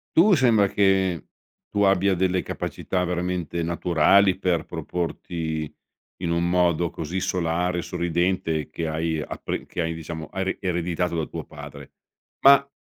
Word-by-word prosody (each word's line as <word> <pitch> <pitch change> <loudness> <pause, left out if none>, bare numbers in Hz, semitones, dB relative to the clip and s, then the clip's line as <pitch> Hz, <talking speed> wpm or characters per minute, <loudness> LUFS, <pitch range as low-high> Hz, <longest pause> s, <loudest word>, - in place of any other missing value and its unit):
Tu 195 +5 +6
sembra 115 - +4
che 95 -3 +2 0.4
tu 100 - +1
abbia 95 0 +3
delle 90 0 +1
capacità 90 -1 -3
veramente 90 -1 -2
naturali 85 +3 +3
per 90 -3 0
proporti 80 -3 -4 0.5
in 85 -2 -1
un 85 +1 +1
modo 85 -1 +2
così 80 +4 -4
solare 90 0 0
e - - -1
sorridente, 85 -3 -1
che 80 +1 -3
hai 80 0 -1
appre - - -5
che 90 - -3
hai, 80 0 -1
diciamo 80 0 -6
hai 95 0 -2
re 95 - -2
ereditato 90 -1 -1
da 80 -2 -1
tuo - - -6
padre. - - -11 0.5
Ma 140 0 +7
90 Hz, 145 wpm, -24 LUFS, 85-95 Hz, 0.5 s, Ma